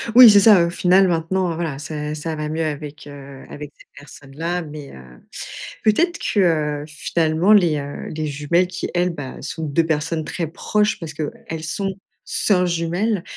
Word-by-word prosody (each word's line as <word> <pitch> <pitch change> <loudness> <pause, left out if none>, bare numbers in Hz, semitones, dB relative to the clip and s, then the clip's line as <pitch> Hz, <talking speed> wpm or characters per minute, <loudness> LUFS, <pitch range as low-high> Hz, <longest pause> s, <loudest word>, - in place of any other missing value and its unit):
Oui, 250 -2 +11
c'est 205 -1 +7
ça, 195 -5 +7
au - - -2
final 185 +2 +4
maintenant, 175 +1 0
voilà, 160 -5 -3
c'est 150 0 -5
ça 155 +1 -4
va 150 0 -4
mieux 160 +2 -2
avec, 150 -1 -5
heu, 140 -1 -11
avec 150 0 -8
cette - - -19
personne-là. 150 +5 -5
Mais, 150 -3 -9
heu, 65 - -11 0.8
peut-être 340 +12 +2
que 155 -7 +1
finalement, 160 +4 0
les, 175 -7 +4
heu, 140 0 -7
les 155 0 -2
jumelles 150 +5 +1
qui, 180 0 -5
elles, 180 +1 +1
bah 145 -6 -8
sont 160 - -5
2 155 +3 +1
personnes 160 0 -1
très 170 +2 -3
proches 210 +6 0
parce 160 -3 -7
qu'elles 165 +1 -6
sont 195 +4 -3 0.3
soeurs 180 -3 +1
jumelles, 175 +4 -1
165 Hz, 170 wpm, -21 LUFS, 150-180 Hz, 0.8 s, Oui